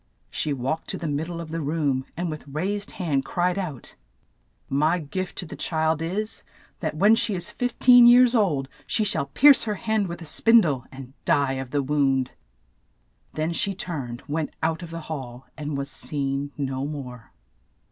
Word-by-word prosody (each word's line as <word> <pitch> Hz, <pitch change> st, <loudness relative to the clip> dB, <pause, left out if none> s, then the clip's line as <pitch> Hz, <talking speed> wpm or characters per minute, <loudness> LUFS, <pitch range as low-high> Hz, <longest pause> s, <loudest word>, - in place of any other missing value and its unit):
She 150 Hz, -, -1 dB
walked 135 Hz, +4 st, -2 dB
to -, -, -3 dB
the -, -, -6 dB
mid 150 Hz, +2 st, -2 dB
die 170 Hz, -1 st, -5 dB
of 165 Hz, -2 st, -7 dB
the 165 Hz, 0 st, -2 dB
room, 145 Hz, -3 st, -1 dB
and 175 Hz, -1 st, -2 dB
with 155 Hz, -1 st, -8 dB
raised 195 Hz, +8 st, -2 dB
hand 150 Hz, -7 st, -1 dB
cried 180 Hz, +5 st, 0 dB
out, 155 Hz, -10 st, -6 dB, 0.8 s
''My 155 Hz, +5 st, +3 dB
gift 180 Hz, +4 st, -5 dB
to -, -, -3 dB
the -, -, -8 dB
child 160 Hz, -1 st, 0 dB
is 200 Hz, +6 st, -2 dB, 0.2 s
— -, -, -31 dB
that 155 Hz, -3 st, -3 dB
when 205 Hz, +6 st, +6 dB
she 225 Hz, -2 st, +2 dB
is 175 Hz, -, -3 dB
fif 245 Hz, -1 st, -3 dB
teen 245 Hz, -1 st, +8 dB
years 245 Hz, 0 st, +7 dB
old, 165 Hz, -, +2 dB, 0.2 s
she 220 Hz, -, +1 dB
shall 195 Hz, -8 st, 0 dB
pierce 275 Hz, -, +6 dB
her 210 Hz, -2 st, -1 dB
hand 220 Hz, -1 st, 0 dB
with 170 Hz, 0 st, -6 dB
a 165 Hz, -, -9 dB
spin 230 Hz, +8 st, +5 dB
die, 145 Hz, -8 st, 0 dB
and 130 Hz, -1 st, -10 dB
die 140 Hz, -2 st, +2 dB
of 130 Hz, -, -7 dB
the 145 Hz, +1 st, 0 dB
wound." 135 Hz, -2 st, +1 dB, 1.0 s
Then 155 Hz, +2 st, -1 dB
she 195 Hz, +3 st, 0 dB
turned, 135 Hz, -10 st, -5 dB
went 155 Hz, +1 st, -3 dB
out 160 Hz, +2 st, 0 dB
of 170 Hz, -, -8 dB
the 165 Hz, 0 st, -6 dB
hall, 130 Hz, -6 st, -7 dB
and 150 Hz, -2 st, -4 dB
was 140 Hz, +1 st, -3 dB
seen 140 Hz, -1 st, -2 dB
no 135 Hz, -1 st, -2 dB
more. 125 Hz, -6 st, -8 dB
155 Hz, 190 wpm, -25 LUFS, 140-185 Hz, 1.0 s, teen